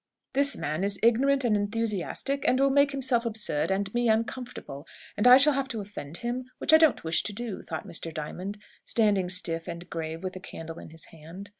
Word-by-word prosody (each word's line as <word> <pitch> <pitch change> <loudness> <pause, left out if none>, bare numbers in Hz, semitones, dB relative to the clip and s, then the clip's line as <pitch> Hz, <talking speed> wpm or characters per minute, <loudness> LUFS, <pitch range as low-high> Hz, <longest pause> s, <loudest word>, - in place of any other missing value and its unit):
"This 280 +1 +2
man 155 +5 -2
is 200 0 -1
ignorant 270 +4 +4
and 230 -3 +2
enthusiastic, 220 +5 -2
and 255 - +3
will 275 0 +4
make 280 +1 +4
himself 260 -3 0
absurd 215 -10 -1
and 195 +1 -1
me 240 -1 +1
uncomfortable, 225 - -3 0.3
and 210 - +2
I 250 +1 +10
shall 290 +2 +5
have 275 0 -1
to 230 -4 -4
offend 185 -6 -7
him, 250 +1 -2
which - - +2
I - - +11
don't 315 -3 +3
wish 165 0 +1
to - - -3
do," 225 -1 -5
thought 160 -2 -6
Mr. 165 0 -1
Diamond, 180 +7 -5 0.3
standing 205 -5 +1
stiff 165 -2 0
and 170 0 -7
grave 165 +1 -5
with 185 0 -3
the 185 - -7
candle 165 -3 -8
in - - -10
his 160 0 -10
hand. 165 +6 -11
205 Hz, 205 wpm, -27 LUFS, 170-250 Hz, 0.3 s, I